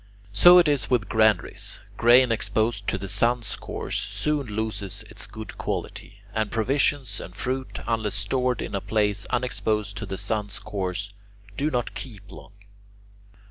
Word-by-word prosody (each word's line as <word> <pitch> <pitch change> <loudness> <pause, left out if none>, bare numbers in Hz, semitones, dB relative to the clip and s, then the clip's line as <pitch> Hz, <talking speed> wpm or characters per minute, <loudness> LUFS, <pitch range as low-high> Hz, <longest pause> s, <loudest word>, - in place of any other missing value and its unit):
So 175 - +9
it 175 -2 +6
is 145 -3 +1
with 120 -4 +1
granaries: 110 -4 +2 0.2
grain 120 +1 +6
exposed 110 -2 0
to - - +1
the 100 +1 -6
sun's 115 +4 +1
course - - -4
soon 150 -3 -1
loses 105 -3 -3
its - - -8
good - - -9
quality, 100 0 -5
and 110 -1 0
provisions 130 0 +1
and 90 - -9
fruit, 130 +5 -3
unless 110 -3 0
stored 125 -1 0
in - - -6
a 100 - -1
place 105 -1 0
unexposed 110 -4 -1
to 105 - -5
the 95 0 -4
sun's 105 0 -2
course, 100 0 -4 0.4
do 145 +7 0
not 125 -4 -1
keep 105 -7 -8
long. 100 - -12
110 Hz, 150 wpm, -25 LUFS, 100-125 Hz, 0.4 s, So